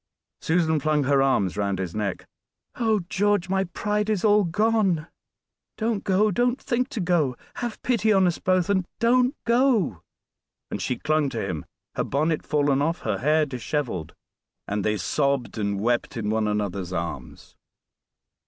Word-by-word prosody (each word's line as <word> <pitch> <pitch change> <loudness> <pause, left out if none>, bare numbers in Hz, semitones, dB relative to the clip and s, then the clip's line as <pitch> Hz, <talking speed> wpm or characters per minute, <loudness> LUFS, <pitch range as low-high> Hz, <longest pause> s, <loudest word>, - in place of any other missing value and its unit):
Susan 160 -2 +2
flung 150 0 +1
her 135 0 +3
arms 115 -9 +2
round 100 -2 -1
his 90 -2 -4
neck. 105 -3 -3 0.5
"Oh! 220 -4 +1
George, 205 -2 +1
my 190 0 +1
pride 210 +4 -2
is 215 -1 0
all 210 0 +5
gone; 195 -3 +1 0.7
don't 220 -2 -1
go, 205 +3 +2
don't 245 +6 +1
think 250 +1 -1
to 265 - -5
go; 165 -8 +1 0.2
have 240 -2 -4
pity 220 -4 +2
on 195 -2 +4
us 175 -2 0
both, 185 -2 +1
and 190 -3 +1
don't 250 +3 +3
go." 235 - +2 0.7
And - - -3
she 125 - -1
clung 155 +1 +1
to 115 -6 -3
him 80 -6 -4 0.3
her - - -1
bonnet 155 +3 0
fallen 145 -2 +1
off, 165 +4 0
her 105 -4 -2
hair 155 +3 +3
disheveled 125 - -3 0.5
and 105 0 -2
they 105 0 +1
sobbed 140 - -1
and 100 -1 -1
wept 120 +3 0
in 105 -2 -1
one 110 -1 +1
another's 100 -3 -2
arms. 85 -1 -6
155 Hz, 160 wpm, -25 LUFS, -, 0.7 s, all